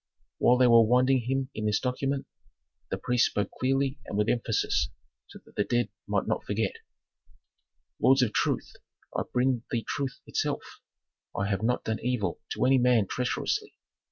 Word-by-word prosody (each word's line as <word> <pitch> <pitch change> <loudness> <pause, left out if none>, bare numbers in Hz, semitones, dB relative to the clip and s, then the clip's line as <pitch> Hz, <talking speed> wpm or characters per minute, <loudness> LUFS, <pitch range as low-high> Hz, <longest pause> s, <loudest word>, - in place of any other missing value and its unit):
While 125 - +5
they 125 - +5
were 115 -1 +7
winding 125 +1 +3
him 135 0 -1
in 110 0 -2
this 105 -1 +2
document 135 +2 -2 0.6
the - - -2
priest 125 -1 +2
spoke 105 -1 -2
clearly 135 +1 +1
and 100 - -4
with 105 +1 +2
emphasis, 120 - +1 0.4
so - - -12
that - - -19
the 105 - +2
dead 120 +2 0 0.2
might - - 0
not - - -1
forget: 105 -1 -1 1.3
"Lords 135 0 +5
of 110 - -1
truth, - - 0 0.4
I - - +1
bring 125 -1 +1
thee 115 -3 -2
truth 135 -3 -3
itself. - - -1 0.7
I 100 - 0
have 100 0 -1
not 120 +3 0
done 110 0 -2
evil 115 -8 -1
to 110 +4 0
any 130 0 +5
man 120 -4 +4
treacherously. 275 - -2
125 Hz, 165 wpm, -28 LUFS, 110-130 Hz, 1.3 s, were